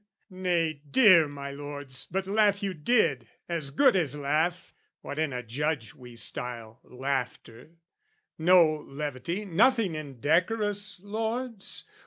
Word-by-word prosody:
nay, 170 -5 -1
dear 185 - +6
my 140 -1 -7
lords, 145 -2 -7
but 190 +1 -2
laugh 205 0 +2
you 195 -1 -1
did, 150 - +1 0.2
As 165 -5 -2
good 250 - +4
as 150 -6 0
laugh, 155 +5 -1 0.3
what 145 - -6
in 155 -2 0
a 125 -1 -4
judge 135 +1 -2
we 125 -2 -13
style 115 -1 -3
Laughter 130 +1 -5 0.6
no 165 -2 +5
levity, 150 +7 -4
nothing 215 +1 +3
indecorous, 180 - -1
lords! 225 +1 -3
160 Hz, 120 wpm, -28 LUFS, 140-195 Hz, 0.6 s, dear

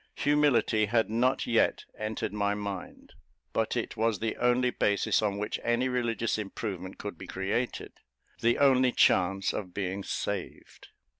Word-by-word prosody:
Humility 145 -7 +3
had 110 0 +1
not 125 +4 +1
yet 115 -1 +2
entered 110 -1 -3
my 100 -1 0
mind; 100 -2 -7 0.4
but - - 0
it - - -3
was 110 -1 +1
the 110 +2 -2
only 125 +1 +2
basis 100 -2 +1
on 100 -2 0
which 105 +1 -3
any 120 +2 +1
religious 115 -3 -1
improvement 95 -2 -5
could 100 -5 -7
be 95 - -8
created 100 +6 -2 0.5
the 120 +1 +2
only 130 -2 +4
chance 95 +1 +3
of 90 -4 -5
being 95 0 -3
saved. 100 -1 -5
110 Hz, 145 wpm, -29 LUFS, 100-120 Hz, 0.5 s, only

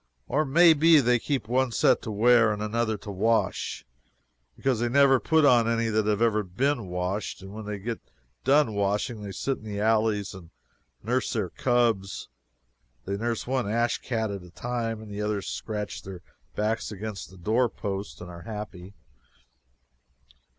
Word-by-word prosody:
Or 150 +4 +1
may 165 +4 +6
be 160 +1 +6
they 125 -2 +3
keep 135 -3 -2
one 125 +1 +1
set - - +3
to - - -6
wear 115 +1 +5
and 105 - -3
another 110 +1 -1
to 100 +1 -8
wash; 110 +4 0 0.7
because 130 -4 0
they 120 0 0
never 135 0 +5
put 160 +2 +3
on 120 -4 +5
any 115 0 +1
that 110 -1 +1
have 105 +1 +2
ever 110 -2 +3
been 120 +4 -1
washed. 90 +3 -3
When 105 +2 -8
they 105 -1 -3
get 115 +3 -4 0.4
done 140 -3 +4
washing, 105 +3 -1
they 100 -1 -6
sit 130 +9 -2
in - - -17
the 105 -2 -5
alleys 110 -2 +1
and 90 -4 -12 0.5
nurse 125 +4 0
their 105 -6 -2
cubs. 115 -6 0 0.8
They 100 - -2
nurse 115 +2 -2
one 130 -4 -1
ash 115 +2 +1
cat 110 -3 -2
at 100 -1 -5
a 90 - -13
time, 115 +2 -3
and 105 - -11
the 100 +1 -4
others 105 -2 -2
scratch 105 -2 -4
their 95 -2 -9 0.3
backs 110 +1 -1
against 105 0 -6
the 95 - -15
door 115 +7 +1
post 100 -2 -5
and 90 - -7
are 85 0 -10
happy. 105 -3 -8
110 Hz, 170 wpm, -27 LUFS, 100-120 Hz, 0.8 s, may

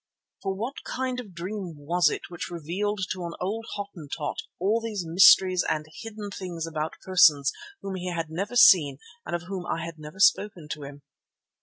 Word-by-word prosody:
For 195 -1 -2
what 235 +8 -5
kind 255 -1 -3
of 245 - -7
a - - -15
dream 180 0 -6
was 170 +5 +2
it - - -4
which 175 - -5
revealed 185 +5 -3
to 185 -1 -3
an 170 - -5
old 220 +5 -3
Hottentot 170 -7 -5 0.2
all 210 +6 +2
these 210 -5 -4
mysteries 185 +2 +6
and 155 -1 -1
hidden 215 -2 -7
things 175 -4 -5
about 155 -1 -3
persons 150 -7 +5 0.3
whom 195 - -4
he 180 -1 -4
had 165 -2 -3
never 200 +8 -3
seen 155 - +7 0.3
and - - -1
of 175 - -4
whom 185 0 -5
I 165 - -2
had 165 -1 -8
never 155 +5 -10
spoken 200 -4 +3
to 150 - -5
him? 140 0 -11
180 Hz, 185 wpm, -26 LUFS, 165-205 Hz, 0.3 s, seen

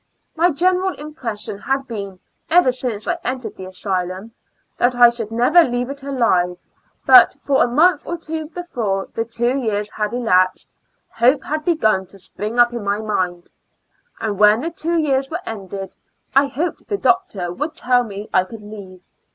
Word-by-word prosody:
My 340 +2 +3
general 370 +4 +1
impression 240 -9 -6
had 270 +4 -2
been, 200 -5 -6 0.3
ever 335 -6 +5
since 245 -4 -4
I 345 -1 -1
entered 255 -1 -4
the 190 - -8
asylum, 185 +2 -4 0.5
that 245 +1 +2
I 240 -1 +7
should 230 -3 -6
never 245 +10 +5
leave 245 -1 -2
it 280 0 -9
alive; 225 -10 +1 0.5
but, - - +8
for 275 -1 +3
a - - +1
month 300 +6 +3
or 345 - -3
two 320 -1 -5
before 240 - -3
the 225 - -1
two 235 +2 -1
years 210 -4 -2
had 210 -1 -2
elapsed, 185 -7 +1 0.4
hope 255 +4 +3
had 305 +1 -3
begun 215 - +1
to 195 - -16
spring 210 +4 -6
up 240 0 +5
in 235 -3 -4
my 200 0 0
mind; 185 -5 -3 0.7
and 205 -3 -3
when 210 +2 +5
the 330 +3 -3
two 335 +1 -2
years 275 -4 +1
were 325 - -2
ended 195 -3 -7 0.4
I 275 +1 +5
hoped 320 +6 -4
the 405 - -1
doctor 215 - 0
would 305 - -4
tell 250 -4 +2
me 205 -2 -7
I 185 - +4
could 215 +2 -11
leave. 200 -3 -11
240 Hz, 175 wpm, -20 LUFS, 205-295 Hz, 0.7 s, but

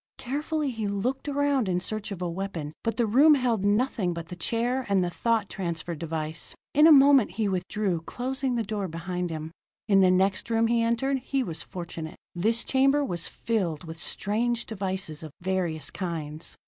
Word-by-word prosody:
Carefully 290 +2 -2
he 225 -3 -3
looked 245 +9 -2
around 280 -6 +1
in 180 -1 +1
search 215 +3 -4
of 180 -2 -4
a - - 0
weapon, 170 -4 -4
but 225 -1 -1
the 235 - +3
room 280 +8 +6
held 240 -7 +1
nothing 205 -3 +1
but 170 0 -6
the 180 - -6
chair 235 +8 0
and 195 -2 +3
the 175 - -1
thought 225 +1 +1
transference 170 -4 -4
device. 160 0 -3 0.2
In 300 +2 +7
a - - +8
moment 275 - +7
he 215 +1 0
withdrew, 190 -1 -1
closing 260 +6 -2
the 230 - 0
door 205 -2 -3
behind 175 +1 -3
him. 160 0 -5 0.4
In 195 -2 +5
the 185 - +6
next 190 +3 +2
room 225 0 +3
he 230 0 +2
entered, 235 +4 +1
he 270 +1 -1
was 165 -6 -4
fortunate. 170 -3 -7 0.2
This 225 +6 +1
chamber 275 +2 +3
was 175 -7 -2
filled 185 -9 -2
with 165 0 -8
strange 235 +3 -1
devices 190 -6 -3
of 160 - -7
various 175 -5 -1
kinds. 160 -4 -5
200 Hz, 185 wpm, -27 LUFS, 175-240 Hz, 0.4 s, a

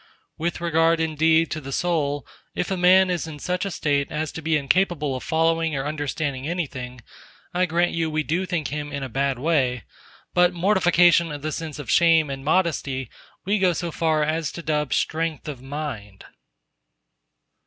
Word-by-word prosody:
With 170 +2 -2
regard, 165 -1 +2
indeed, 160 +1 +2
to 155 - -3
the 135 0 -8
soul, 145 -3 -1 0.3
if 180 - -2
a - - +1
man 185 +1 +5
is 175 -2 -2
in 155 -2 -7
such 180 +5 -2
a - - -2
state 145 -5 -1
as 155 0 -2
to 160 - -7
be 160 0 +1
incapable 150 -1 +1
of 130 - -5
following 165 -1 +1
or 135 0 -2
understanding 145 -2 -3
anything, 130 -8 -4 0.5
I 180 +1 +2
grant 175 +2 +1
you 165 -1 -1
we 155 0 -1
do 175 +5 -1
think 170 -6 -2
him 145 0 -4
in 140 -1 -4
a 130 - -5
bad 135 +2 0
way. 130 -5 +1 0.5
But 180 0 +4
mortification 175 -3 +4
of 145 -1 -7
the 155 - -2
sense 155 -1 -5
of 145 -6 -5
shame 165 -4 +4
and 135 0 -6
modesty 145 -6 0 0.3
we 205 +2 +1
go 185 -2 +3
so 170 +1 -3
far 155 -1 +1
as 155 0 -1
to 170 - -7
dub 150 -2 -1
strength 160 -2 -1
of 140 -5 -6
mind! 135 -8 -6
155 Hz, 180 wpm, -23 LUFS, 145-170 Hz, 0.5 s, man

